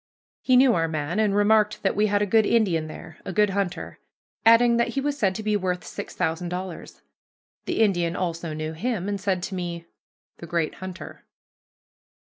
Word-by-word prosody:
He 255 -1 +4
knew 255 -1 +6
our 165 -4 +1
man, 160 +4 -2
and 210 -2 +2
remarked 210 +1 +3
that 195 - +1
we 210 +1 +3
had 205 0 +1
a - - +2
good 220 +2 +4
Indian 180 -9 +2
there, 155 +1 -10
a - - -5
good 210 +2 +2
hunter; 195 -2 -3 0.4
adding 235 +1 +6
that 235 - +2
he 275 - -2
was 285 +1 -1
said 200 -9 0
to 220 - -5
be 210 0 +1
worth 185 -2 -1
six - - -8
thousand 165 +2 -1
dollars. 180 0 -7 0.6
The - - -1
Indian 175 -5 +2
also 170 -3 -3
knew 155 +1 -4
him, 200 +2 -2
and 200 -1 -3
said 190 -3 -1
to 195 - -4
me, 175 -2 -4 0.5
"The 170 - -9
great 165 -2 -1
hunter." 185 -1 -8
190 Hz, 190 wpm, -25 LUFS, 170-215 Hz, 0.6 s, knew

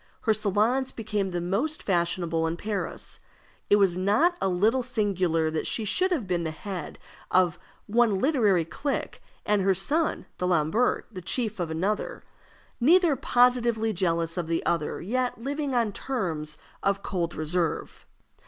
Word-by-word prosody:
Her 220 - +3
salons 215 +6 +1
became 210 -3 -2
the 175 -1 -2
most 210 - -1
fashionable 170 -3 0
in 165 +1 -3
Paris. 205 +2 -4 0.5
It - - +7
was 190 -3 +3
not 245 - +3
a - - +2
little 210 +8 +2
singular 185 -9 0
that 160 - -2
she 220 - -1
should 365 - +1
have 315 - -1
been 175 -2 -1
the 160 - -2
head 175 +1 -6 0.3
of 180 -3 +3 0.3
one 225 -2 +3
literary 210 - +2
clique, 275 - -3 0.2
and 210 -1 +2
her 190 0 +3
son, 295 - 0
D'Alembert, 180 +6 +1
the 185 -4 -7
chief 215 +3 -2
of 170 -2 -2
another 200 - -2 0.6
neither 330 +4 +5
positively 240 -4 +2
jealous 170 -2 0
of 175 -2 -2
the 165 0 -1
other, 170 -2 -1
yet 250 +6 -1
living 280 +2 -2
on 230 -3 +2
terms 165 - -3 0.2
of 200 0 0
cold 175 -3 -2
reserve. 160 +2 -2
200 Hz, 150 wpm, -27 LUFS, 175-240 Hz, 0.6 s, It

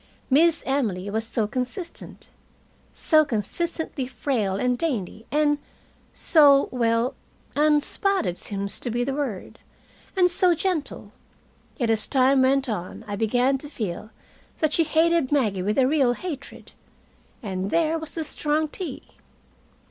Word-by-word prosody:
Miss 325 +4 +4
Emily 205 -9 -1
was 220 +1 -2
so 225 -2 0
consistent, 255 - -6 0.6
so 310 -1 +3
consistently 285 - -3
frail 235 -8 -1
and 250 +5 +1
dainty 230 - -3
and 295 0 +2 0.5
so 285 -4 +5
well, 235 0 +1 0.4
unspotted 300 - +2
seems 200 +1 -3
to 245 - -4
be 240 +1 -1
the 270 +2 -2
word 265 -10 -4 0.6
and 360 -1 +4
so 355 0 +3
gentle, 355 -3 -2 0.7
yet 235 -4 +1
as 215 -1 +1
time 265 0 +4
went 270 +1 +3
on 195 -6 -5
I 205 - -3
began 245 +5 +1
to 290 - -9
feel 215 - -5 0.5
that 310 -1 0
she 330 - +3
hated 325 -2 +2
Maggie 215 -10 +1
with 210 +3 -1
a 265 - +5
real 265 -3 +3
hatred. 285 -1 -8 0.7
And 190 -2 -3
there 325 +2 +1
was 320 -1 -4
the 325 - -2
strong 305 0 -1
tea! 365 +2 -5
270 Hz, 135 wpm, -24 LUFS, 225-310 Hz, 0.7 s, so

